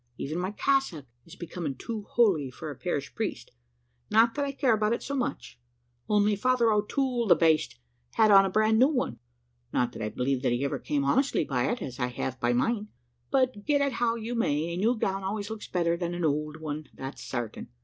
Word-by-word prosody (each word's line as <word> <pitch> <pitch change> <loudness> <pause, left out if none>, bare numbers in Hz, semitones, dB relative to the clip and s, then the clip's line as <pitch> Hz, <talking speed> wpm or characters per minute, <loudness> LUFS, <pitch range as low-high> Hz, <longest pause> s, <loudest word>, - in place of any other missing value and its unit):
Even 155 +5 -3
my 185 +1 -1
cassock 210 - 0 0.2
is - - -12
becoming 170 -4 -5
too 215 - -6
holy 190 - +3
for 125 - -7
a - - -8
parish - - -3
priest; - - -4 0.6
not 230 +1 +5
that 285 - -1
I 280 - -2
care 270 -3 +2
about 215 +1 +1
it - - -3
so 280 - -4
much, 250 - -3 0.5
only 210 0 +3
Father 245 +1 +2
O'Toole, 235 +3 0
the - - +7
baste! 160 -2 +2 0.4
had 215 -1 +4
on 195 -1 +8
a 195 - 0
bran 215 +3 +3
new 260 - +7
one 250 - -2 0.5
not 125 -1 +1
that - - -8
I 110 - -1
believe 125 +3 -1
that 125 -2 +1
he 125 +3 0
ever 140 - -2
came 145 -2 -1
honestly 265 - +2
by 130 - 0
it, 240 - -3
as 125 -1 -7
I 125 - +1
have 125 +1 -4
by 120 -1 +1
mine 210 - 0 0.4
but, 255 -6 +1
get 290 +2 +2
it 280 -1 +1
how 235 -1 +1
you 230 +1 -4
may, 165 -8 0
a - - -3
new 225 +6 +2
gown 195 -2 -1
always 205 +2 -3
looks 220 -1 -6
better 170 -2 +1
than 175 0 -3
an 175 -1 -1
ould 150 +1 -1
one, 155 -1 -5
that's 135 +1 -7
certain. 120 -3 -5
195 Hz, 215 wpm, -28 LUFS, 145-235 Hz, 0.6 s, on